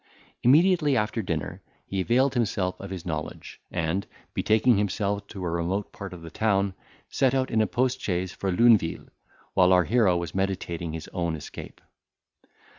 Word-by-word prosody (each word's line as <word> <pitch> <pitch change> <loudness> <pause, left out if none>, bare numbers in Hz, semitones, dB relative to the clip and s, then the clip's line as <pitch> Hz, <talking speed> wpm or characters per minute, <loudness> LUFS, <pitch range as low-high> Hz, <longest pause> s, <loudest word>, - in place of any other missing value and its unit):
Immediately 150 +1 +4
after 110 +1 0
dinner, 80 -6 -4 0.2
he 95 -1 -2
availed 125 +7 +2
himself 100 -6 0
of 100 - -7
his 95 -3 -6
knowledge, 80 -3 -6
and, 90 +3 -2 0.3
betaking 110 0 +3
himself 100 0 -1
to 95 -4 -6
a - - -1
remote 85 +4 -2
part 100 -1 -7
of 90 -2 -10
the 80 - -9
town, 100 -1 +1 0.3
set 135 -1 +1
out 130 -1 0
in 110 - +3
a 110 - +2
post 130 +1 0
chaise 90 -1 -1
for 95 0 -3
Luneville, 105 -4 +3 0.4
while 90 -1 +5
our 90 -1 +6
hero 105 -4 +3
was 85 -1 -4
meditating 90 -4 -2
his 80 -2 -6
own 85 -2 -1
escape. 75 - -9
95 Hz, 165 wpm, -26 LUFS, 90-115 Hz, 0.4 s, our